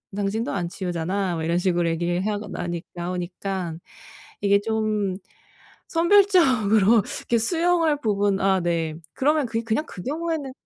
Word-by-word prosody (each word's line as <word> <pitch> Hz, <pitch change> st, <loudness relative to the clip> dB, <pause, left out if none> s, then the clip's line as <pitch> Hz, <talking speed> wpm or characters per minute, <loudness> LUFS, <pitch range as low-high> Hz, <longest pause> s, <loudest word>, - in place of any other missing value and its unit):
당신도 205 Hz, +3 st, -1 dB
안 175 Hz, -3 st, -2 dB
치우잖아?" 180 Hz, +1 st, -2 dB
뭐 160 Hz, -, -3 dB
이런 170 Hz, +2 st, +1 dB
식으로 175 Hz, -2 st, +1 dB
얘기를 175 Hz, +3 st, -1 dB
하고 210 Hz, 0 st, -2 dB
나니 175 Hz, -3 st, -4 dB
나오니까 180 Hz, 0 st, -4 dB, 0.7 s
이게 200 Hz, 0 st, +4 dB
좀 215 Hz, -3 st, -1 dB, 0.7 s
선별적으로 260 Hz, -, +4 dB, 0.2 s
이렇게 235 Hz, -, 0 dB
수용할 330 Hz, +3 st, +2 dB
부분 200 Hz, -4 st, +1 dB
아 190 Hz, -1 st, +3 dB
네. 165 Hz, -2 st, -1 dB, 0.2 s
그러면 295 Hz, +1 st, +2 dB
그게 230 Hz, 0 st, -2 dB
그냥 230 Hz, +7 st, -1 dB
그 180 Hz, -, -9 dB
경우에는 310 Hz, -1 st, -3 dB
200 Hz, 310 characters per minute, -24 LUFS, 175-250 Hz, 0.7 s, 이게